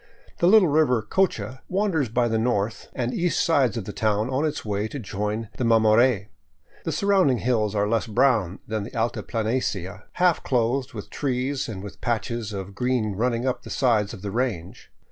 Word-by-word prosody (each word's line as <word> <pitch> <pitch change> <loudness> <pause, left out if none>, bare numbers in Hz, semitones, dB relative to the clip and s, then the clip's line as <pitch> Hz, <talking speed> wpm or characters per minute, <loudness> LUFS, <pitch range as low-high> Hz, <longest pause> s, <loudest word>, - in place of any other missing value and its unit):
The 170 - +4
little 205 -1 +7
river 145 -7 +3
Cocha 130 - 0
wanders 185 - 0
by 120 +1 +1
the 110 -1 0
north 110 -2 -1
and 125 0 -2
east 175 0 0
sides 135 -8 +2
of 110 - -4
the 105 - -6
town 110 +2 0
on 135 +4 +1
its 150 - -3
way 105 0 -1
to 140 - -7
join 105 -1 -3
the - - -1
Mamore; 115 -1 +4 0.6
the - - -1
surrounding 190 -10 +3
hills 110 -4 0
are 100 0 +1
less 115 +1 0
brown 110 -6 +2
than 110 0 -2
the 100 - -8
altiplanicie, 110 -4 -2
half 180 -2 +2
clothed 130 +2 0
with 105 -3 -8
trees 135 -1 -2
and 95 -3 -6
with 100 - -10
patches 115 -1 -2
of 100 -1 -6
green 125 -2 0
running 120 +3 0
up 130 -1 -1
the - - -11
sides 110 -6 +1
of 95 - -10
the 100 - -3
range. 115 -4 -3
115 Hz, 185 wpm, -24 LUFS, 105-130 Hz, 0.6 s, little